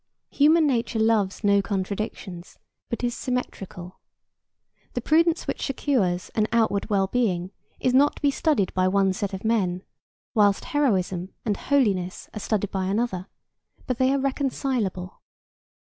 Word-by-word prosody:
Human 310 Hz, +3 st, +5 dB
nature 240 Hz, -4 st, 0 dB
loves 220 Hz, -3 st, +1 dB
no 200 Hz, -1 st, +4 dB
contradictions, 195 Hz, -2 st, -4 dB, 0.3 s
but 235 Hz, -, -4 dB
is 240 Hz, -1 st, 0 dB
symmetrical. 195 Hz, -8 st, -5 dB, 0.9 s
The 245 Hz, -, -2 dB
prudence 330 Hz, +5 st, +3 dB
which -, -, -3 dB
secures 225 Hz, -10 st, 0 dB
an 215 Hz, -1 st, +1 dB
outward 225 Hz, -3 st, +1 dB
well 195 Hz, -2 st, +2 dB
being 190 Hz, -5 st, 0 dB, 0.3 s
is 255 Hz, -, +1 dB
not 285 Hz, +3 st, +4 dB
to -, -, -13 dB
be 285 Hz, -, +4 dB
studied 275 Hz, -, +1 dB
by 185 Hz, 0 st, +2 dB
one 195 Hz, 0 st, +2 dB
set 200 Hz, +1 st, -3 dB
of 190 Hz, +2 st, -6 dB
men, 190 Hz, -5 st, +1 dB, 0.5 s
whilst 205 Hz, -4 st, +3 dB
heroism 190 Hz, -10 st, 0 dB
and 210 Hz, -3 st, +1 dB
holiness 200 Hz, -10 st, 0 dB
are 215 Hz, -, -5 dB
studied 205 Hz, -1 st, -1 dB
by 190 Hz, -1 st, -1 dB
another, 195 Hz, -2 st, -1 dB, 0.6 s
but 255 Hz, -1 st, -2 dB
they 260 Hz, 0 st, +4 dB
are 275 Hz, -, +2 dB
reconcilable. 260 Hz, -9 st, -2 dB
215 Hz, 145 wpm, -25 LUFS, 190-255 Hz, 0.9 s, Human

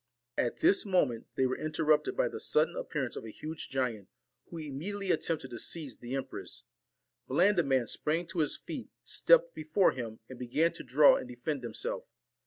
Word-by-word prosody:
At 120 Hz, -, -1 dB
this 380 Hz, +4 st, +5 dB
moment 160 Hz, -, +1 dB
they 130 Hz, -, +2 dB
were 130 Hz, -, -1 dB
interrupted 155 Hz, -1 st, +1 dB
by -, -, +3 dB
the -, -, -6 dB
sudden -, -, +2 dB
appearance -, -, -3 dB
of -, -, -6 dB
a 115 Hz, -, -7 dB
huge 155 Hz, +8 st, -7 dB
giant, 125 Hz, -7 st, -2 dB, 0.4 s
who 170 Hz, -, -7 dB
imme 145 Hz, -3 st, -6 dB
diately 200 Hz, 0 st, -1 dB
attempted 155 Hz, -6 st, -1 dB
to 120 Hz, -, -4 dB
seize 150 Hz, -4 st, -1 dB
the 125 Hz, +2 st, -5 dB
empress. 135 Hz, -, -5 dB, 0.7 s
Blandi 180 Hz, +7 st, +4 dB
man 135 Hz, -4 st, +2 dB
sprang 160 Hz, +9 st, -1 dB
to 185 Hz, -2 st, -3 dB
his 150 Hz, -, +1 dB
feet, -, -, -7 dB
stepped -, -, +4 dB
before 200 Hz, -, +2 dB
him, 115 Hz, -3 st, -6 dB
and 130 Hz, -, -10 dB
began 150 Hz, +7 st, +2 dB
to -, -, -8 dB
draw 145 Hz, +2 st, +6 dB
and -, -, -6 dB
defend 125 Hz, +4 st, -3 dB
himself. 475 Hz, -, -3 dB
150 Hz, 185 wpm, -31 LUFS, 125-175 Hz, 0.7 s, draw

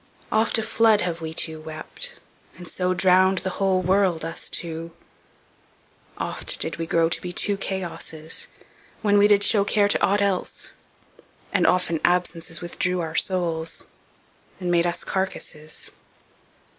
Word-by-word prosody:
Oft 220 Hz, +1 st, +3 dB
a 225 Hz, -, 0 dB
flood 220 Hz, -1 st, +4 dB
Have 170 Hz, -2 st, -2 dB
wee 160 Hz, -1 st, -4 dB
two 160 Hz, -1 st, -2 dB
wept, 155 Hz, 0 st, -5 dB, 0.4 s
and 175 Hz, 0 st, -10 dB
so 180 Hz, +2 st, -1 dB
Drownd 185 Hz, +1 st, +4 dB
the 190 Hz, -, -1 dB
whole 190 Hz, -1 st, +2 dB
world, 185 Hz, -3 st, +2 dB
us 165 Hz, +1 st, -4 dB
two; 165 Hz, 0 st, -3 dB, 1.2 s
oft -, -, -2 dB
did 160 Hz, -1 st, -3 dB
we 165 Hz, -1 st, -3 dB
grow 165 Hz, 0 st, +3 dB
To 165 Hz, -, -1 dB
be 180 Hz, -, -5 dB
two 200 Hz, +3 st, 0 dB
Chaosses, 170 Hz, -5 st, -5 dB, 0.6 s
when 205 Hz, -1 st, +4 dB
we 205 Hz, -, +6 dB
did 205 Hz, -1 st, +5 dB
show 205 Hz, 0 st, +4 dB
Care 205 Hz, 0 st, +3 dB
to 205 Hz, -, +1 dB
ought 200 Hz, +1 st, +3 dB
else; 195 Hz, -2 st, -2 dB, 0.8 s
and -, -, +3 dB
often 180 Hz, -3 st, +2 dB
absences 175 Hz, -2 st, +1 dB
Withdrew 180 Hz, +1 st, -1 dB
our 160 Hz, -2 st, -3 dB
soules, 165 Hz, -4 st, 0 dB, 0.7 s
and 180 Hz, -2 st, -1 dB
made 170 Hz, 0 st, +3 dB
us 170 Hz, -, -2 dB
carcasses. 165 Hz, -5 st, -4 dB
180 Hz, 145 wpm, -24 LUFS, 165-195 Hz, 1.2 s, we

